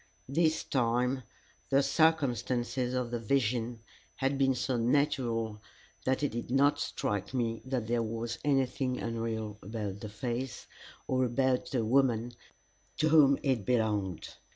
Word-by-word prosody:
This 160 +3 +1
time 125 +1 +1 0.5
the 135 +1 +4
circumstances 130 -6 +1
of 125 -2 -1
the 120 - -1
vision 120 -1 0 0.3
had 135 +1 0
been 135 -1 +2
so 130 +1 -1
natural 115 -3 0 0.4
that 130 +2 +1
it 145 - +1
did 120 +1 -5
not 140 +3 +3
strike 105 +5 -2
me 115 -2 -1
that 130 -3 -2
there 120 +1 +1
was 115 0 -3
anything 135 -2 +1
unreal 110 -2 -3
about 105 -1 -5
the 105 - -6
face, 120 +3 -4 0.4
or 130 0 +2
about 130 +1 +1
the 120 -4 0
woman 120 -1 +2 0.7
to 155 - +2
whom 145 -3 +6
it 130 -7 +1
belonged. 105 -7 0
125 Hz, 135 wpm, -31 LUFS, 115-135 Hz, 0.7 s, whom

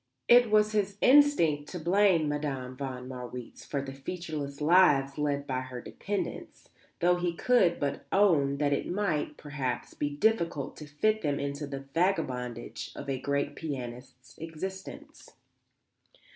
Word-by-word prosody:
It 240 -1 +7
was 210 0 +4
his 205 -2 0
instinct 250 - +4
to 180 - -5
blame 175 -1 +3
Madame 140 -4 -3
von 130 -2 -5
Marwitz 125 -1 -8
for 140 -2 -3
the 135 -1 -7
featureless 145 -1 -5
lives 150 -4 +4
led 145 -1 0
by 130 -2 -2
her 130 -1 -7
dependents, 205 +9 -5 0.3
though 175 +1 +4
he 175 -1 -1
could 185 -6 +3
but 140 -1 -3
own 155 -9 +3
that 145 0 +1
it - - -1
might, 175 -6 -1
perhaps, 140 -4 -4
be 145 - -2
difficult 165 -4 0
to 150 - -9
fit 215 +9 +1
them 145 -3 -1
into 140 +1 -3
the 135 -1 -5
vagabondage 125 - -1
of 140 - -5
a 130 -1 -3
great 140 0 -1
pianist's 125 -4 -7
existence. 190 +4 -8
150 Hz, 145 wpm, -29 LUFS, 135-180 Hz, 0.3 s, It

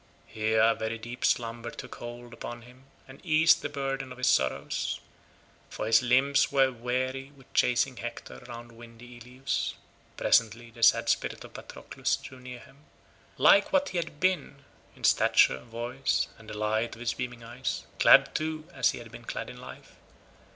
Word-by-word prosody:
Here 110 0 0
a 115 - +5
very 110 +1 -3
deep 120 +3 -8
slumber 115 0 0
took - - -9
hold 120 0 -9
upon 120 0 -7
him 125 +2 -17 0.2
and 130 +2 -14
eased 160 -1 +4
the 145 - -3
burden 135 -2 -3
of 125 - -9
his 125 - -1
sorrows, 65 - 0 0.7
for - - -5
his 115 +2 +5
limbs 130 +3 +3
were 135 -1 +4
weary 130 +3 -3
with 135 - -20
chasing 125 +1 +2
Hector 120 0 -7
round 120 -1 -9
windy 120 +1 -13
Ilius. 125 +3 -3 0.4
Presently 115 +1 +2
the 115 - -14
sad 115 - +5
spirit - - -1
of - - -13
Patroclus - - -3
drew 130 - -11
near 125 0 -9
him, 135 - -18 0.6
like 200 - +6
what 285 0 +2
he 180 - -4
had 165 -3 -6
been 155 -6 -1 0.3
in - - -18
stature, 65 - +4
voice, 120 - -2
and 110 -1 -13
the 105 - -6
light 110 +2 -1
of - - -15
his 120 -1 -1
beaming 125 -2 -6
eyes, 120 +3 -4
clad, - - +7
too, 155 0 -3
as - - +3
he - - -7
had - - -11
been - - -11
clad - - -5
in - - -12
life. - - -12
125 Hz, 175 wpm, -28 LUFS, 115-135 Hz, 0.7 s, clad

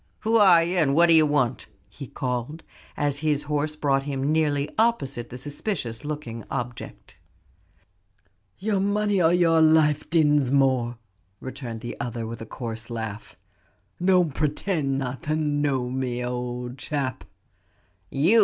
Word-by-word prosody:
Who 225 +1 +3
are 185 -6 +7
you; 175 +2 -1
and 140 -5 +3
what 170 +2 +5
d'ye 160 -1 +7
want?" 145 -5 +1 0.2
he 140 - -10
called, 125 +5 -4 0.3
as 145 -1 0
his 150 -2 0
horse 150 +1 -1
brought 140 -3 +1
him 140 0 -2
nearly 150 -2 +1
opposite 140 - +1
the 125 - -7
suspicious 145 - -4
looking 145 -7 -5
object. 125 -3 -6 1.4
"Your 205 -1 0
money 205 0 +1
or 165 0 +4
your 165 -2 +4
life, 155 -2 +4
Dinsmore," 135 -6 +2 0.4
returned 125 -4 -7
the 120 - -7
other 120 -1 -4
with 115 0 -7
a 115 - -7
coarse 115 -2 -6
laugh. 110 -2 -6 0.7
"Don't 180 -5 +3
pretend 150 -1 -1
not 130 -1 -4
to 155 0 0
know 145 -4 0
me, 125 -2 -2
old 125 +1 -4
chap." 135 -4 -3 0.9
"You!" 175 +12 +4
145 Hz, 135 wpm, -25 LUFS, 125-160 Hz, 1.4 s, are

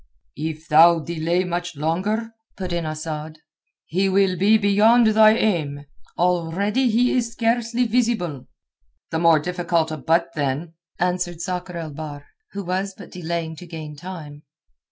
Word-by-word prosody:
"If 160 +1 -4
thou 165 +3 +7
delay 170 +2 -1
much 175 -1 -3
longer," 190 +10 -1 0.3
put 185 -2 -4
in 170 -2 -2
Asad, 155 0 -5 0.5
"he 190 +4 0
will 190 -1 +3
be 205 +5 +4
beyond 215 +3 +4
thine 220 0 +6
aim. 150 -10 -1 0.3
Already 180 +8 +1
he 240 +3 +2
is 235 -2 0
scarcely 235 +1 +1
visible." 220 - 0 0.6
"The 160 - 0
more 165 -1 +5
difficult 170 -1 -1
a 155 - -3
butt, 165 +4 +1
then," 145 +3 -2 0.2
answered 180 -1 -1
Sakr 180 0 -4
el 160 -2 -5
Bahr, 145 -1 -8 0.3
who 200 - -4
was 190 +2 -2
but 200 - -12
delaying 170 -2 -4
to 180 - -10
gain 155 -3 -8
time. 150 -3 -9
175 Hz, 145 wpm, -22 LUFS, 160-200 Hz, 0.6 s, thou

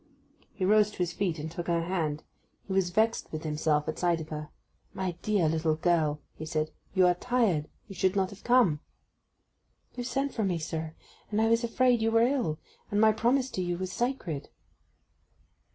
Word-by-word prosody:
He 185 - -1
rose 210 +1 +5
to - - -13
his 175 -1 -1
feet, 180 -4 -1
and 155 +1 -5
took 170 +1 -5
her 170 -1 +1
hand. 160 -4 -2 0.4
He 195 - -4
was 190 -2 +2
vexed 220 +5 +1
with 155 0 -5
himself 150 -1 0
at 155 - -3
sight 175 -2 +2
of 155 -1 -7
her. 150 -1 -5 0.5
'My 190 -1 -1
dear 205 -6 +2
little 160 0 +1
girl!' 155 -3 +1
he - - -8
said. 155 -1 -2 0.2
'You 185 -1 +5
are 180 - +5
tired—you 195 -4 -1
should 185 +1 +1
not 190 -1 +1
have 200 - -13
come.' 240 -12 +4 1.1
'You 245 - -4
sent 270 +3 -1
for 220 - -1
me, 185 -3 +1
sir; 160 0 -4 0.3
and 210 - 0
I 220 - +4
was 230 +1 +3
afraid 240 0 +3
you 225 - +2
were 230 +1 +4
ill; 245 - 0 0.3
and 205 - 0
my 220 0 +6
promise 250 +4 +1
to 185 - -2
you 175 -1 -1
was 185 0 -4
sacred. 240 - -2
185 Hz, 190 wpm, -29 LUFS, 160-220 Hz, 1.1 s, my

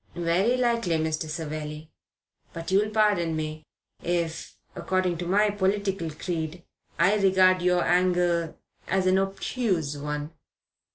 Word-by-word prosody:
"Very 175 +8 +1
likely, 235 -8 +1
Mr. 155 0 -2
Savelli; 155 -1 -5 0.6
but 165 +2 -6
you'll 205 +3 +3
pardon 205 -7 +2
me 155 0 -4 0.4
if, 170 -2 -3 0.2
according 185 -3 -1
to 175 - -3
my 205 +3 +3
political 195 -3 -1
creed, 160 +1 -4 0.3
I 185 +5 +4
regard 185 -2 +4
your 180 0 +2
angle 175 -2 +1 0.3
as 190 0 +1
an 185 +1 +4
obtuse 195 - -1
one." 150 +1 -4
175 Hz, 120 wpm, -26 LUFS, 160-195 Hz, 0.6 s, I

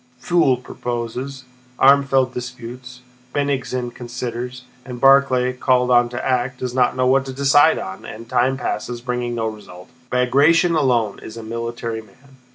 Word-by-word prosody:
Pfuel 165 -5 +2
proposes, 125 +3 -5 0.3
Armfeldt 135 -1 +4
disputes, 125 0 -8 0.3
Bennigsen 130 -4 -2
considers, 125 +1 -6 0.2
and 125 -1 -8
Barclay, 135 -1 +4
called 125 -1 +1
on 120 -1 +4
to 120 +1 -5
act, 125 0 0
does 125 -1 -4
not 125 -1 +2
know 130 0 +1
what 130 +1 +3
to 130 - -5
decide 140 +3 +4
on, 95 0 -7
and 115 +1 -9
time 130 +2 +1
passes 120 -1 -4
bringing 125 -1 -3
no 115 -1 -2
result. 105 -3 -8 0.2
Bagratión 145 +7 +3
alone 120 -8 +1
is 110 - -10
a 115 - -7
military 115 0 -4
man. 130 +6 -22
125 Hz, 150 wpm, -20 LUFS, 120-135 Hz, 0.3 s, Armfeldt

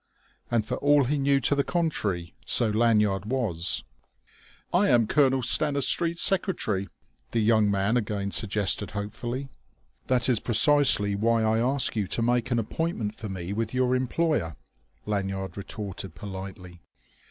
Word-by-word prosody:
And 115 -3 0
for - - -3
all 145 0 +4
he 140 +3 -1
knew 140 0 +2
to 145 - +2
the 140 0 +1
contrary, 105 - -2
so 115 -3 +4
Lanyard 105 -3 +2
was. 110 -10 -1 0.9
"I 185 +4 +3
am 120 -3 +4
Colonel 135 0 +2
Stanistreet's 150 +6 +1
secretary," 110 - -1 0.4
the 115 - -1
young 110 -1 +3
man 100 +4 +1
again 100 -3 -2
suggested 100 -1 0
hopefully. 120 +6 -5 0.6
"That 125 -2 +2
is 125 -5 +2
precisely 130 -4 +4
why 115 +3 +1
I 110 0 +2
ask 130 +2 +1
you 105 -3 -1
to 115 - -2
make 120 0 +1
an 120 - 0
appointment 115 -2 -2
for 110 -1 -8
me 95 0 -5
with 115 +3 -3
your 130 0 +2
employer," 130 - -1 0.5
Lanyard 95 -2 -3
retorted 100 -3 -7
politely. 95 -1 -9
115 Hz, 140 wpm, -26 LUFS, 100-130 Hz, 0.9 s, all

